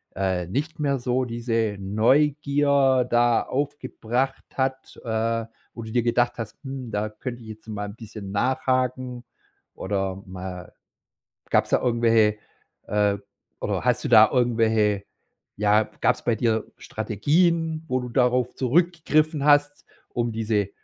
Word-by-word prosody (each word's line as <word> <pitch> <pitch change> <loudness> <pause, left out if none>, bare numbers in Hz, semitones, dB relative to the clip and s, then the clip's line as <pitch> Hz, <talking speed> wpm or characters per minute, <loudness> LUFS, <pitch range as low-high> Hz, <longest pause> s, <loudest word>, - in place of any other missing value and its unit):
äh, 95 -2 -1
nicht 150 - -3
mehr 140 -3 0
so 125 +1 0
diese 115 -3 -1
Neugier 140 +4 +2
da 120 0 +3
aufgebracht 135 -2 -2
hat, 130 0 -3
äh, 115 0 -1 0.3
wo 115 - -8
du 110 - -8
dir 120 -1 +1
gedacht 120 0 +2
hast: 110 -2 -6
„Hm, 135 -4 -6
da 105 +1 -1
könnte 120 +3 -7
ich 110 - -11
jetzt 110 +1 -11
mal 105 -1 -4
'n 100 - -10
bisschen 105 -3 -9
nachhaken”, 130 +2 -1 0.5
oder 95 -1 -3
mal 90 -1 -8 0.8
gab's - - +2
da - - +3
irgendwelche 115 -3 +3 0.5
äh, 105 -1 +1 0.4
oder - - -2
hast - - +1
du - - -1
da 110 -2 +8
irgendwelche 110 -5 +2 0.5
ja, 105 +1 +3 0.2
gab's - - +2
bei 120 -2 +2
dir 110 -1 0
Strategien, 160 - 0
wo 130 0 0
du 125 - -6
darauf 125 0 +1
zurückgegriffen 155 +1 +1
hast, 145 0 +3 0.2
um 120 -1 -2
diese 105 -3 0
120 Hz, 135 wpm, -24 LUFS, 110-130 Hz, 0.8 s, da